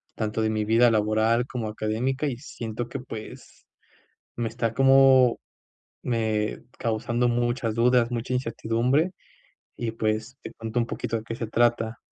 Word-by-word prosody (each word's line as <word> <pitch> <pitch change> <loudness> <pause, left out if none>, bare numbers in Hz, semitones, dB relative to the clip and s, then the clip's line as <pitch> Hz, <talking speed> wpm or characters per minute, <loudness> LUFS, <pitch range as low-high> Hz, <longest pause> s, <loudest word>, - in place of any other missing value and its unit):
tanto 110 0 -2
de 110 - +1
mi 110 -1 -1
vida 115 +2 +5
laboral 110 +2 +2
como 120 -5 -4
académica, 115 +6 -2
y 125 -4 -3
siento 120 -3 -6
que 135 - -5
pues, 115 -4 -10 0.7
me 115 -1 -2
está 115 0 -2
como 135 -1 +5 0.6
me 110 -3 -1 0.2
causando 120 +2 0
muchas 120 -1 0
dudas, 120 0 +3
mucha 120 +1 -2
incertidumbre, 125 +6 0 0.6
y 115 -2 -2
pues, 110 +3 -2
te - - -8
cuento 115 +1 -4
un 115 - 0
poquito 115 -1 -3
de 110 - -8
qué 115 - -5
se 115 0 -4
trata. 115 -1 +1
115 Hz, 150 wpm, -25 LUFS, 110-125 Hz, 0.7 s, vida